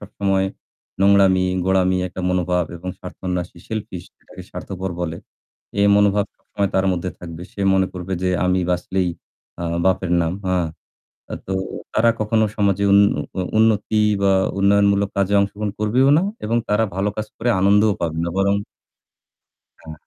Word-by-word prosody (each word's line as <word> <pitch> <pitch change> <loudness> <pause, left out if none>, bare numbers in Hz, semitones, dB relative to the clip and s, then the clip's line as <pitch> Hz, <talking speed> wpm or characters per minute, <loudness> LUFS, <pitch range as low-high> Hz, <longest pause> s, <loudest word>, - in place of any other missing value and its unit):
সবসময় 95 -1 -1 0.6
নোংরামি, 95 -2 +4 0.2
গোঁড়ামি, 95 -1 +2
একটা 95 - -7
মনোভাব 90 -1 +1
এবং 90 +2 -8
স্বার্থান্বেষী, 90 -1 -5
selfish 105 -5 -5
যেটাকে - - -13
স্বার্থপর 95 0 -5
বলে। 85 -2 -3 0.6
এই 100 - +5
মনোভাব 100 0 +3
সবসময় 100 -1 -3
তার 95 0 +2
মধ্যে 90 +1 -3
থাকবে। 85 -1 -8
সে - - -8
মনে 95 0 +3
করবে 90 +1 -6
যে 90 - +1 0.2
আমি 90 0 +2
বাঁচলেই 90 +1 0 0.5
আ - - -2 0.2
বাপের 95 -1 +1
নাম। 80 0 -1
হা 95 0 +1 0.8
আ - - -1
তো 95 - -2 0.4
তারা 115 +2 +4
কখনো 110 +1 +2
সমাজে 100 -1 +1
উন্ন 100 +1 +7 0.3
অ - - +1 0.2
উন্নতি 110 -1 +2 0.2
বা 100 0 +4 0.3
উন্নয়নমূলক 100 0 +3
কাজে 100 +1 +1
অংশগ্রহণ 100 +1 -2
করবেও 120 +6 +3
না - - +1 0.2
এবং 115 +2 0
তারা 105 +2 +2
ভালো 100 +2 0
কাজ 110 0 -3
করে 120 - -2
আনন্দও 105 +2 +4
পাবে 80 -1 -2
না। - - -2
বরং 100 +1 +2 1.3
হ্যাঁ। 80 - -10
95 Hz, 150 wpm, -21 LUFS, 90-100 Hz, 1.3 s, উন্ন